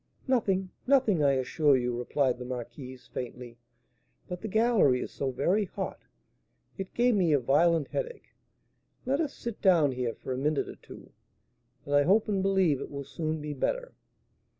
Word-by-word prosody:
"Nothing, 195 -7 +1 0.2
nothing, 250 - +3
I 140 -1 +4
assure 135 +2 +2
you," 125 -1 -1
replied 125 +1 0
the - - -5
marquise, 125 +1 -7
faintly; 120 -1 -7 0.7
"but 180 0 -6
the 220 - -4
gallery 220 - +3
is - - -5
so 135 - -2
very 175 +11 +1
hot, - - -5 0.8
it 190 -1 -7
gave 245 +1 +3
me 180 -7 +3
a 145 - +4
violent 155 +4 +2
headache. 485 0 -5 0.7
Let 275 +5 +1
us 300 -3 -3
sit 235 -3 -6
down 170 -8 +4
here 125 -2 -2
for 130 - -5
a 130 - -3
minute 150 +1 0
or - - -9
two. - - -14 0.7
I 145 0 +3
hope 195 +8 +3
and 200 -2 0
believe 190 -7 +2
it - - -6
will 140 0 -6
soon 155 +3 -3
be 150 0 -4
better." - - -2
155 Hz, 170 wpm, -29 LUFS, 130-200 Hz, 0.8 s, I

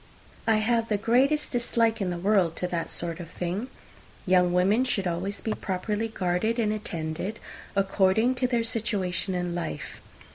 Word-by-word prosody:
I 225 - +5
have 225 +1 +2
the 210 - +2
greatest 265 +8 +2
dislike 230 -2 +1
in 190 - 0
the 175 - -2
world 185 -3 +2
to 180 - -2
that 170 -2 -2
sort 170 0 -3
of 170 -2 -7
thing. 180 +8 -3 0.6
Young 180 -1 +4
women 190 +7 +3
should 210 -7 0
always 180 +4 -2
be 220 - -1
properly 210 +4 -2
guarded 205 +2 0
and 215 -3 +1
attended, 175 0 -4 0.4
according 195 +4 +3
to 250 - +4
their 240 -2 +1
situation 200 -4 -1
in 175 -1 -2
life. 125 - -5
200 Hz, 160 wpm, -27 LUFS, 180-225 Hz, 0.6 s, I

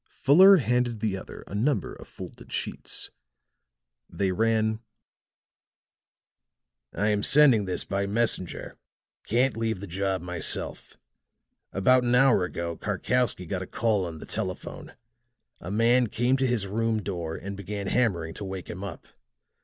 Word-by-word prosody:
Fuller 190 +8 +7
handed 120 - 0
the 105 -3 -1
other 95 - -9
a - - -11
number 115 +1 0
of - - -12
folded - - -11
sheets. - - -3 1.0
They 95 -2 -1
ran: 110 +2 +1 2.1
"I 105 +2 0
am 105 -1 +1
sending 130 -6 +5
this 90 - -2
by 100 +1 -2
messenger. 105 -4 -1 0.5
Can't 125 +3 +2
leave 115 -3 -1
the 100 - -6
job 95 0 -2
myself. 90 -2 -4 0.7
About 125 +7 +4
an 120 0 +2
hour 125 -7 +5
ago 85 -2 -4
Karkowsky 125 -7 -1
got 90 +2 -3
a 95 - -6
call 105 -5 0
on 80 -1 -7
the - - -9
telephone. - - -5 0.7
A 85 - -8
man 115 +4 +3
came 120 +4 +1
to 130 0 +1
his 120 -5 0
room 110 +2 -1
door 85 -5 -4
and 100 +2 -6
began 100 +1 -5
hammering 95 -9 0
to 105 - -7
wake 95 -2 -6
him 95 +3 -7
up. 100 -4 -7
105 Hz, 145 wpm, -27 LUFS, 95-120 Hz, 2.1 s, Fuller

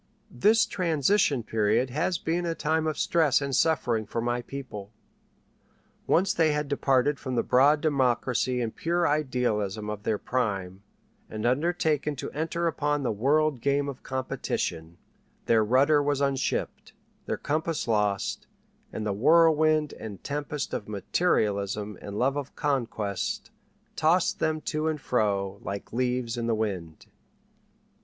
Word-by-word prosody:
This 210 - +4
transition 165 - +1
period 110 +3 +1
has 160 +6 0
been 170 +2 -1
a 165 -1 -2
time 160 +1 0
of 155 - -2
stress 160 -5 +3
and 140 -2 -2
suffering 120 -9 +1
for 115 - -3
my 120 +1 -1
people. 120 -6 -8 1.2
Once 185 +2 +3
they 160 -3 +3
had 150 0 -1
departed 140 0 +1
from 130 -2 -4
the - - +1
broad 145 +4 +4
democracy 130 -3 +1
and 115 -2 -3
pure 170 +1 +1
idealism 110 -8 -1
of 105 -1 -6
their 105 0 0
prime, 100 -7 -2 0.5
and 110 +1 -5
undertaken 150 +2 +1
to 130 - -6
enter 165 +2 -2
upon 145 -3 0
the 125 - 0
world 140 +4 +1
game 140 +2 +1
of 140 -2 -6
competition, 85 -10 -3 0.5
their 115 -1 +4
rudder 140 +7 +4
was 145 -1 0
unshipped, 140 -1 -2 0.3
their - - -1
compass 155 0 -2
lost, 105 -3 0 0.4
and 110 - -4
the 105 - 0
whirlwind 155 +4 +4
and 105 -3 -9
tempest 145 -1 -4
of 105 - -4
materialism 105 - 0
and 100 0 -6
love 135 +4 +1
of 140 -1 -5
conquest 115 -8 -2 0.4
tossed 165 +3 +2
them 155 0 0
to 155 +1 -2
and 155 -1 -1
fro 100 -6 0
like 100 +3 -6
leaves 125 -1 -1
in 115 -1 -2
the 115 - +2
wind. 95 -7 -4
130 Hz, 140 wpm, -27 LUFS, 110-155 Hz, 1.2 s, This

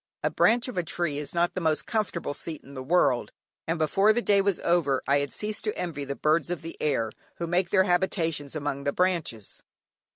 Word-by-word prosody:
A - - +1
branch 240 +2 +3
of 245 -8 -3
a - - 0
tree 165 -3 -2
is 150 +3 -5
not 170 0 +2
the 185 - -3
most 160 -2 +1
comfortable 210 -9 -2
seat 155 +2 -5
in 140 - -13
the 130 - -6
world, 130 -4 +2 0.4
and 165 +1 0
before 195 +7 +3
the 240 - 0
day 200 -1 +4
was 195 -2 +1
over 160 -6 +2
I 140 +1 +4
had 140 0 -3
ceased 210 0 -3
to 210 - -2
envy 150 -5 -3
"the 140 0 -4
birds 155 +2 +1
of 175 -4 -3
the 165 - -7
air, 115 -7 0 0.2
who 170 - -3
make 175 +1 +1
their 190 -2 +4
habitations 165 -5 0
among 145 -2 -3
the 140 - +1
branches." 170 - -1
165 Hz, 220 wpm, -27 LUFS, 145-185 Hz, 0.4 s, day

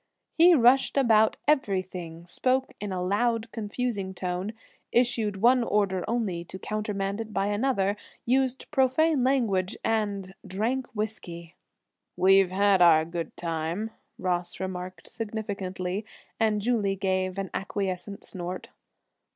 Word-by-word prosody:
He 345 +1 +7
rushed 260 +1 +4
about 220 -5 +4
everything, 185 - -1
spoke 260 +8 0
in 205 -1 -3
a 180 -1 -2
loud, 225 +4 0
confusing 210 -3 -3
tone, 180 +3 -3 0.4
issued 235 -4 +2
one 250 +1 +6
order 200 -4 +1
only 215 -7 -1
to 180 +2 -8
countermand 205 0 -3
it 220 -1 -7
by 195 -1 0
another, 205 -2 +1 0.3
used 260 +1 0
profane 270 +1 +3
language 225 -9 +1
and 200 -4 -1
drank 225 +7 -2
whisky. 175 -6 -5 0.6
"We've 195 0 +5
had 195 0 +3
our 160 -2 +6
good 170 0 -5
time," 170 +6 -3 0.3
Ross 175 -1 -2
remarked 185 -2 -5
significantly, 200 -3 -4 0.4
and 215 -2 +2
Julie 215 -5 +1
gave 185 -1 -1
an 195 -1 -3
acquiescent 195 0 -3
snort. 180 0 -6
200 Hz, 120 wpm, -27 LUFS, 185-230 Hz, 0.6 s, He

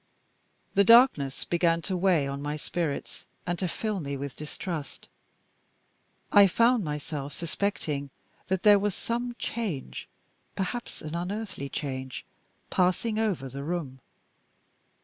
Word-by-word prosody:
The 200 - +5
darkness 215 - +5
began 170 -1 +2
to 190 - -1
weigh 175 -6 +3
on 140 0 -4
my 145 +1 -2
spirits, 155 -1 -4 0.2
and 175 0 -1
to 185 - 0
fill 210 +3 -2
me 140 -3 -3
with 140 0 -5
distrust. 150 -1 -6 1.2
I 200 -1 +8
found 230 +4 +3
myself 150 -2 -4
suspecting 160 -5 -2 0.4
that 190 0 0
there 205 -1 +8
was 205 -1 0
some 240 +1 -3
change 200 - -4 0.5
perhaps 240 +6 -4
an 155 0 -5
unearthly 185 -4 -4
change 130 -2 -4 0.5
passing 185 +5 +2
over 195 -12 0
the 135 +2 -6
room. 150 -5 -3
175 Hz, 125 wpm, -28 LUFS, 145-200 Hz, 1.2 s, I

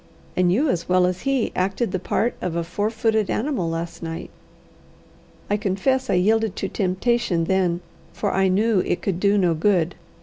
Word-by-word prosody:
And 180 -1 +3
you 265 - +2
as 175 - -1
well 180 0 +4
as 180 0 -1
he 270 -4 +1
acted 195 +5 0
the 185 - -1
part 230 +6 0
of 175 -2 -2
a 170 - 0
four 205 +5 -1
footed 220 -2 0
animal 220 - -1
last 165 +1 -4
night." 165 -1 -6 1.2
"I 205 - +1
confess 240 +6 0
I - - +3
yielded 215 +2 +2
to - - -2
temptation 190 -1 0
then, 180 -1 +1 0.3
for 205 - -2
I 190 0 +3
knew 205 +2 +2
it 175 -1 -1
could 185 -3 -1
do 200 +1 +3
no 180 -4 +3
good. 175 0 +2
190 Hz, 180 wpm, -23 LUFS, 180-220 Hz, 1.2 s, well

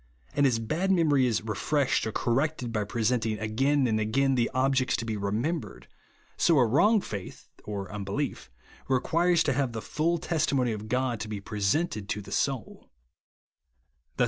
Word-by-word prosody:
And 140 - +3
as 120 -3 +2
bad 155 - -1
memory 150 -8 +3
is 110 -3 0
refreshed 125 +4 0
or - - -2
corrected 125 +1 -1
by 105 -1 0
presenting 110 0 0
again 135 +7 +1
and 110 -3 +1
again 135 +6 +1
the 120 -2 +1
objects 130 0 +1
to 115 - -3
be 110 -1 -2
remembered, 105 - -3 0.5
so 165 -3 +4
a 125 - +5
wrong 205 - +4
faith 100 - -7 0.2
(or 100 -2 -5
unbelief) 105 - -3 0.4
requires 165 +7 +2
to 140 - +1
have 130 -2 -1
the 115 - -3
full 170 +3 0
testimony 140 -7 0
of 110 0 -5
God 125 0 0
to 110 - -5
be 105 -1 -4
presented 105 - -1
to 105 - -1
the - - -12
soui. 135 -4 -2
125 Hz, 160 wpm, -28 LUFS, 110-145 Hz, 0.5 s, a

